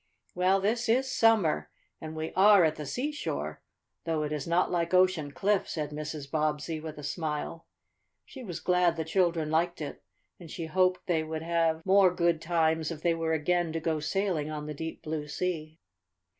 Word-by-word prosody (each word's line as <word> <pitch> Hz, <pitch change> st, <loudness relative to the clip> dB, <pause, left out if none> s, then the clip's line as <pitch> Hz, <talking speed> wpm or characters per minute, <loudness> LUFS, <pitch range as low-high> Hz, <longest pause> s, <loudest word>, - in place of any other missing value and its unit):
"Well, 185 Hz, +2 st, +3 dB
this 225 Hz, +4 st, 0 dB
is 260 Hz, +3 st, +2 dB
summer, 185 Hz, -, +3 dB, 0.3 s
and 155 Hz, 0 st, -7 dB
we 155 Hz, 0 st, -4 dB
are 200 Hz, 0 st, +7 dB
at 155 Hz, -1 st, +2 dB
the 150 Hz, -2 st, -6 dB
seashore, 295 Hz, -, -3 dB, 0.4 s
though 160 Hz, -2 st, 0 dB
it 150 Hz, -, -3 dB
is 150 Hz, -1 st, -3 dB
not 170 Hz, +2 st, +2 dB
like 170 Hz, 0 st, 0 dB
Ocean 180 Hz, -6 st, +3 dB
Cliff," 200 Hz, +6 st, 0 dB
said 150 Hz, -2 st, -3 dB
Mrs. 150 Hz, -1 st, -6 dB
Bobbsey 155 Hz, +1 st, -1 dB
with 155 Hz, -1 st, -8 dB
a 150 Hz, -, -8 dB
smile. 155 Hz, +1 st, -4 dB, 0.6 s
She 265 Hz, -, -10 dB
was 175 Hz, -8 st, -6 dB
glad 180 Hz, -2 st, +3 dB
the 160 Hz, -1 st, -3 dB
children 165 Hz, -3 st, +1 dB
liked 170 Hz, +2 st, +1 dB
it, 150 Hz, -2 st, -6 dB, 0.4 s
and 170 Hz, -3 st, -11 dB
she 165 Hz, +1 st, -5 dB
hoped 185 Hz, +2 st, +1 dB
they 170 Hz, -3 st, +1 dB
would 155 Hz, 0 st, -5 dB
have 165 Hz, -1 st, 0 dB
more 190 Hz, -1 st, +5 dB
good 170 Hz, -2 st, +1 dB
times 160 Hz, -1 st, +1 dB
if 160 Hz, -2 st, -7 dB
they 170 Hz, -1 st, +3 dB
were 165 Hz, -1 st, -1 dB
again 170 Hz, +2 st, +1 dB
to 165 Hz, -, -1 dB
go 160 Hz, -1 st, -1 dB
sailing 170 Hz, -2 st, -1 dB
on 150 Hz, -1 st, -5 dB
the 150 Hz, -, -5 dB
deep, 160 Hz, +2 st, -6 dB
blue 155 Hz, -1 st, -4 dB
sea. 155 Hz, 0 st, -3 dB
165 Hz, 185 wpm, -29 LUFS, 155-180 Hz, 0.6 s, are